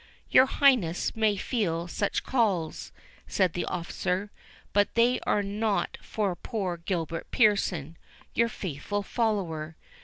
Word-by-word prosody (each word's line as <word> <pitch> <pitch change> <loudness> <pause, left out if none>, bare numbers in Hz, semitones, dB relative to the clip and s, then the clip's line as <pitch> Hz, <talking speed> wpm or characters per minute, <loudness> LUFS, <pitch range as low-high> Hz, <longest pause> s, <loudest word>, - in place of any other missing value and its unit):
"Your 260 - +7
Highness 245 - +3
may 220 -2 +2
feel 175 -7 -1
such 200 +3 -1
calls," 200 -11 0 0.4
said 185 -4 +1
the 175 - -2
officer; 180 +3 -2 0.4
"but 205 0 +2
they 240 +2 +4
are 205 - +2
not 205 +1 -1
for 200 -4 -2
poor 190 -4 -3
Gilbert 165 -1 -3
Pearson, 180 - +2 0.4
your 235 0 +2
faithful 200 +2 -4
follower. 180 -9 -1
200 Hz, 120 wpm, -28 LUFS, 170-220 Hz, 0.4 s, Your